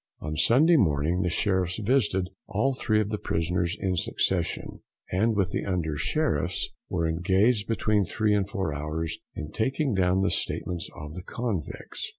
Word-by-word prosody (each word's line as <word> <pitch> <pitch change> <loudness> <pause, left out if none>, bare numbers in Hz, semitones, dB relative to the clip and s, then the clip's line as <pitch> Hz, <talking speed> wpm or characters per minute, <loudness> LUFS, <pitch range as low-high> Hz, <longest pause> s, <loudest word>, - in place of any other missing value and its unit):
On 75 0 -4
Sunday 155 - +5
morning 80 - +2
the 90 - +1
Sheriffs 95 0 +1
visited 105 -5 +1 0.2
all 135 +7 +1
three 110 -4 +1
of 105 -1 0
the 105 -1 -2
prisoners 85 +1 -1
in 95 -1 0
succession, 80 - -1 0.3
and 110 +5 +2
with 95 -4 +1
the - - -1
Under 85 -5 -1
Sheriffs - - 0 0.2
were 85 -2 0
engaged 95 +7 +2
between 110 -3 +1
three 110 +2 +1
and 100 -1 +1
four 95 -6 -2
hours 75 +2 -3 0.2
in 75 - -6
taking 135 +3 0
down 95 0 +2
the 100 - +2
statements 85 -2 -1
of 75 0 -8
the 90 - -6
convicts. 105 - -4
95 Hz, 160 wpm, -27 LUFS, 85-110 Hz, 0.3 s, Sunday